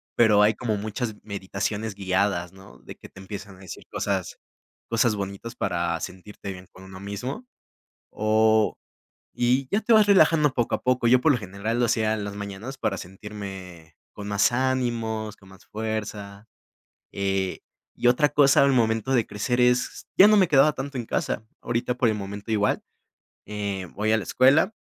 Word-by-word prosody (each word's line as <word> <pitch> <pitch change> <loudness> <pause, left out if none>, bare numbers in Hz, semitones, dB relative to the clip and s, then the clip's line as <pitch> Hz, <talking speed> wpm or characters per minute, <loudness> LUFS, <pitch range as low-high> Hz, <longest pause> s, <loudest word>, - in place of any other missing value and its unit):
pero 105 -3 +5
hay 105 +1 +4
como 110 -3 -2
muchas 110 +2 -4
meditaciones 100 +1 -4
guiadas, 95 -2 -1
¿no?, 95 0 -16
de - - -11
que - - -14
te - - -15
empiezan 100 +1 -8
a - - -18
decir 95 -3 -10
cosas - - -2 0.5
cosas 115 -1 +2
bonitas 100 +4 -6
para 85 -3 -1
sentirte 100 +2 -8
bien 90 0 -12
con 95 - -15
uno 95 0 -11
mismo, 125 - -6 0.7
o, 110 0 +2 0.6
y 125 +2 +1
ya 200 - +2
te 230 +2 +2
vas 215 -2 +6
relajando 160 -6 +5
poco 120 -2 -1
a - - -8
poco. 125 -1 +1
Yo 125 +1 +5
por 160 - +4
lo 125 - +2
general 105 +3 -4
lo 120 - +3
hacía 110 -1 +1
en 105 - -4
las 100 0 -6
mañanas 100 +6 -7
para 95 - -1
sentirme 95 -4 -9 0.2
con 105 - -8
más 105 +2 +2
ánimos, 120 -4 -1
con 95 -1 -19
más 95 - -17
fuerza. 105 -1 -5 0.7
Eh, 95 -1 -1 0.3
y 120 - +2
otra 135 +4 +4
cosa 140 -1 +5
al 140 - +3
momento 115 +1 +1
de 120 -4 +2
crecer 120 +5 -1
es, 125 0 +1
ya 195 - +10
no 215 0 +6
me 185 -4 +4
quedaba 145 +1 +5
tanto 135 -1 -5
en 120 - -4
casa. 110 - -2 0.2
Ahorita 120 +1 -1
por 125 -3 +2
el 110 - 0
momento 100 +1 -7
igual, 105 -2 +1 0.6
eh, 100 -3 -4
voy 110 +1 0
a - - +5
la 110 - -2
escuela, 140 - +4
110 Hz, 180 wpm, -25 LUFS, 100-125 Hz, 0.7 s, ya